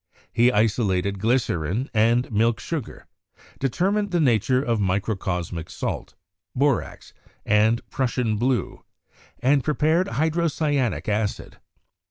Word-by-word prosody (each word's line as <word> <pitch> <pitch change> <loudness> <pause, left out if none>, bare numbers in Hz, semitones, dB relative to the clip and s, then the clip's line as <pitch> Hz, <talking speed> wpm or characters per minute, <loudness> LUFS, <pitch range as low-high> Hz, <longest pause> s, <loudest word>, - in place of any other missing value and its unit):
He 120 +2 +4
isolated 100 -3 +1
glycerin 110 - 0
and 115 +3 +2
milk 115 +1 +2
sugar; 160 -8 -5 0.5
determined 195 - 0
the 175 -2 0
nature 125 -2 +3
of 115 -4 0
microcosmic 95 -4 -2
salt, - - -5 0.4
borax, 140 -1 -1 0.3
and 110 +3 +2
'Prussian 125 -4 0
blue,' 120 -3 -1 0.6
and 135 +1 +3
prepared 155 +4 +1
hydrocyanic 155 - 0
acid. 105 0 -2
120 Hz, 100 wpm, -24 LUFS, 105-140 Hz, 0.6 s, He